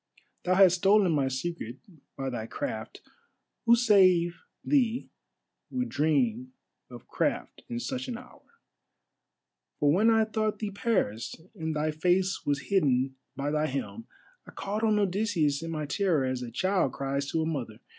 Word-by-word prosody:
Thou 185 Hz, +1 st, +3 dB
hast 185 Hz, -2 st, +6 dB
stolen 195 Hz, 0 st, +4 dB
my 140 Hz, -4 st, +2 dB
secret 130 Hz, -2 st, -4 dB, 0.4 s
by 135 Hz, -1 st, -3 dB
thy 115 Hz, -2 st, -4 dB
craft; 285 Hz, -, -5 dB, 0.7 s
who 235 Hz, -, +8 dB
save 185 Hz, -7 st, +4 dB, 0.2 s
thee 250 Hz, -4 st, +1 dB, 0.6 s
would 250 Hz, -1 st, -2 dB
dream 230 Hz, -, 0 dB, 0.4 s
of -, -, -12 dB
craft -, -, -2 dB
in 235 Hz, 0 st, -3 dB
such 255 Hz, +1 st, -4 dB
an 245 Hz, -2 st, -4 dB
hour? -, -, -14 dB, 1.4 s
For 145 Hz, -1 st, +4 dB
when 210 Hz, +8 st, +4 dB
I 225 Hz, -1 st, +4 dB
thought 215 Hz, -1 st, -1 dB
thee 210 Hz, -2 st, -4 dB
Paris, 195 Hz, -, -1 dB, 0.2 s
and 160 Hz, -1 st, -4 dB
thy 155 Hz, +1 st, 0 dB
face 180 Hz, +4 st, 0 dB
was 140 Hz, -1 st, -1 dB
hidden 135 Hz, -8 st, +2 dB, 0.2 s
by 140 Hz, +2 st, -2 dB
thy 155 Hz, 0 st, +1 dB
helm, 140 Hz, -, -5 dB, 0.4 s
I -, -, -10 dB
called 205 Hz, +2 st, -3 dB
on 215 Hz, -2 st, +3 dB
Odysseus 190 Hz, -7 st, +1 dB
in 165 Hz, -, -5 dB
my 155 Hz, -2 st, -3 dB
terror, 165 Hz, -3 st, +1 dB
as 130 Hz, -1 st, -2 dB
a 125 Hz, -, -5 dB
child 185 Hz, -, 0 dB
cries 140 Hz, 0 st, -2 dB
to 160 Hz, -1 st, 0 dB
a -, -, -1 dB
mother. 125 Hz, -9 st, -4 dB
175 Hz, 155 wpm, -28 LUFS, 145-215 Hz, 1.4 s, who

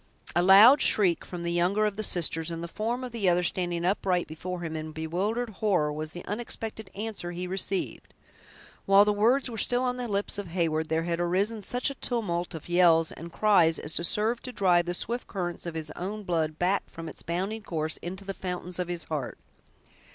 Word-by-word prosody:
A 175 Hz, -, +4 dB
loud 205 Hz, +10 st, +8 dB
shriek 185 Hz, -5 st, +4 dB
from 175 Hz, -2 st, -7 dB
the 170 Hz, -, -1 dB
younger 180 Hz, +5 st, +2 dB
of 210 Hz, -2 st, -1 dB
the 215 Hz, -, -3 dB
sisters, 165 Hz, -4 st, +2 dB
and 165 Hz, 0 st, -5 dB
the -, -, -4 dB
form 230 Hz, +8 st, -3 dB
of 250 Hz, -, -5 dB
the 215 Hz, -5 st, +1 dB
other 175 Hz, 0 st, +2 dB
standing 175 Hz, -1 st, -1 dB
upright 185 Hz, -2 st, +1 dB
before 175 Hz, +3 st, -6 dB
him, 160 Hz, -2 st, -4 dB
in 155 Hz, 0 st, -5 dB
bewildered 195 Hz, +9 st, -2 dB
horror, 185 Hz, -8 st, 0 dB
was 155 Hz, +1 st, -5 dB
the 175 Hz, +1 st, -8 dB
unexpected 220 Hz, -1 st, -5 dB
answer 210 Hz, -4 st, -4 dB
he 175 Hz, +1 st, -4 dB
received. 190 Hz, +1 st, -3 dB, 0.7 s
While 195 Hz, +1 st, +7 dB
the 210 Hz, -, +2 dB
words 235 Hz, +7 st, +2 dB
were 230 Hz, -3 st, -5 dB
still 245 Hz, +3 st, +2 dB
on 250 Hz, 0 st, -1 dB
the 250 Hz, -1 st, -3 dB
lips 205 Hz, 0 st, 0 dB
of 200 Hz, -, -5 dB
Heyward, 165 Hz, -2 st, -1 dB
there 160 Hz, 0 st, 0 dB
had 170 Hz, 0 st, -2 dB
arisen 195 Hz, +6 st, 0 dB
such 245 Hz, +6 st, +1 dB
a 275 Hz, -, -12 dB
tumult 180 Hz, -8 st, -1 dB
of 160 Hz, -, -9 dB
yells 170 Hz, -2 st, +4 dB
and 170 Hz, +2 st, -9 dB
cries 175 Hz, -5 st, +4 dB
as 150 Hz, -, -4 dB
served 215 Hz, +7 st, +1 dB
to 255 Hz, -, -4 dB
drive 175 Hz, -6 st, +3 dB
the 175 Hz, -, -1 dB
swift 240 Hz, +6 st, -3 dB
currents 175 Hz, -3 st, -4 dB
of 165 Hz, -, -5 dB
his 155 Hz, -1 st, -5 dB
own 205 Hz, +6 st, -5 dB
blood 160 Hz, -4 st, -1 dB
back 185 Hz, +3 st, 0 dB
from 165 Hz, 0 st, -8 dB
its -, -, -8 dB
bounding 190 Hz, +6 st, -3 dB
course 160 Hz, -5 st, -3 dB
into 190 Hz, +3 st, -7 dB
the 195 Hz, -, -4 dB
fountains 180 Hz, -1 st, -3 dB
of 180 Hz, -, -1 dB
his 175 Hz, -2 st, -4 dB
heart. 150 Hz, -5 st, -4 dB
180 Hz, 210 wpm, -27 LUFS, 170-210 Hz, 0.7 s, loud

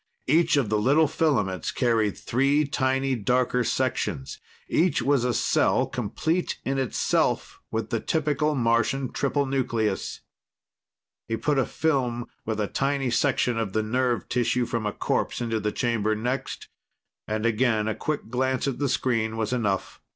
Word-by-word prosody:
Each 165 Hz, +2 st, +3 dB
of 130 Hz, -7 st, +1 dB
the 105 Hz, 0 st, +1 dB
little 145 Hz, +8 st, +4 dB
filaments 115 Hz, -, 0 dB
carried 115 Hz, -5 st, +1 dB
three 140 Hz, +5 st, +2 dB
tiny 135 Hz, -1 st, 0 dB
darker 125 Hz, +2 st, +1 dB
sections; 65 Hz, -, -2 dB, 0.3 s
each 165 Hz, -6 st, +2 dB
was 135 Hz, -1 st, +2 dB
a 125 Hz, -, +1 dB
cell, -, -, +2 dB
complete 170 Hz, +3 st, -2 dB
in 135 Hz, 0 st, 0 dB
itself, 130 Hz, -3 st, 0 dB
with 110 Hz, -1 st, -3 dB
the 115 Hz, -, +1 dB
typical 150 Hz, +1 st, 0 dB
Martian 120 Hz, +2 st, +1 dB
triple 140 Hz, 0 st, 0 dB
nucleus. 120 Hz, -6 st, -1 dB, 1.1 s
He 115 Hz, -, -1 dB
put 145 Hz, +2 st, +1 dB
a 135 Hz, -, +1 dB
film 125 Hz, -6 st, 0 dB, 0.2 s
with 110 Hz, -1 st, -1 dB
a 105 Hz, -, +1 dB
tiny 135 Hz, +2 st, -1 dB
section 125 Hz, -1 st, +1 dB
of 105 Hz, -4 st, -2 dB
the 110 Hz, -, +1 dB
nerve 125 Hz, +2 st, 0 dB
tissue 125 Hz, 0 st, +1 dB
from 115 Hz, -2 st, -2 dB
a -, -, -1 dB
corpse -, -, -1 dB
into 115 Hz, -2 st, -1 dB
the 105 Hz, 0 st, -1 dB
chamber 110 Hz, -3 st, 0 dB
next, 125 Hz, +5 st, -3 dB, 0.6 s
and 110 Hz, +1 st, -2 dB
again 115 Hz, -1 st, +2 dB
a 110 Hz, -, 0 dB
quick 150 Hz, -3 st, -3 dB
glance 130 Hz, +1 st, 0 dB
at 135 Hz, -, -2 dB
the 145 Hz, -2 st, 0 dB
screen 115 Hz, -4 st, 0 dB
was 110 Hz, +1 st, -1 dB
enough. 105 Hz, -6 st, -1 dB
125 Hz, 155 wpm, -26 LUFS, 110-135 Hz, 1.1 s, little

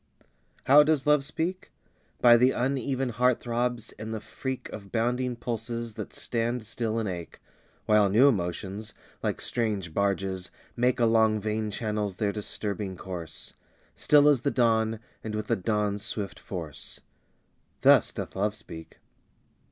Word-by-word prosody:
How 140 Hz, +3 st, +8 dB
does 150 Hz, -2 st, +2 dB
Love 150 Hz, -1 st, +4 dB
speak? 165 Hz, +6 st, -3 dB, 0.5 s
By 120 Hz, -1 st, +8 dB
the 125 Hz, +2 st, +5 dB
uneven 130 Hz, 0 st, -1 dB
heart 125 Hz, +2 st, +2 dB
throbs, 120 Hz, 0 st, -2 dB
and 110 Hz, 0 st, -5 dB
the 110 Hz, -, -3 dB
freak 130 Hz, +4 st, -5 dB
Of 100 Hz, -2 st, -9 dB
bounding 125 Hz, +2 st, 0 dB
pulses 115 Hz, 0 st, -4 dB
that -, -, -6 dB
stand 120 Hz, 0 st, -2 dB
still 115 Hz, 0 st, -2 dB
and 110 Hz, -2 st, -1 dB
ache, 85 Hz, -3 st, -6 dB, 0.5 s
While 105 Hz, -2 st, +4 dB
new 115 Hz, +8 st, +6 dB
emotions, 100 Hz, -1 st, -2 dB, 0.3 s
like -, -, -1 dB
strange 105 Hz, -8 st, -2 dB
barges, 95 Hz, -1 st, -1 dB, 0.3 s
make 125 Hz, +1 st, +2 dB
Along 110 Hz, -2 st, +4 dB
vein 110 Hz, +1 st, -2 dB
channels 105 Hz, -2 st, -2 dB
their 105 Hz, +1 st, 0 dB
disturbing 100 Hz, -2 st, -4 dB
course; 90 Hz, -4 st, -7 dB, 0.4 s
Still 145 Hz, -1 st, +5 dB
as 145 Hz, -5 st, +5 dB
the 140 Hz, -, +1 dB
dawn, 115 Hz, -3 st, +2 dB, 0.2 s
and 110 Hz, -1 st, -4 dB
with 110 Hz, 0 st, -2 dB
the -, -, +1 dB
dawn's 105 Hz, +1 st, -1 dB
swift 105 Hz, -2 st, -4 dB
force 80 Hz, -6 st, -7 dB, 0.8 s
Thus -, -, +6 dB
doth -, -, -6 dB
Love 105 Hz, +2 st, 0 dB
speak. 80 Hz, -7 st, -11 dB
110 Hz, 145 wpm, -28 LUFS, 100-125 Hz, 0.8 s, How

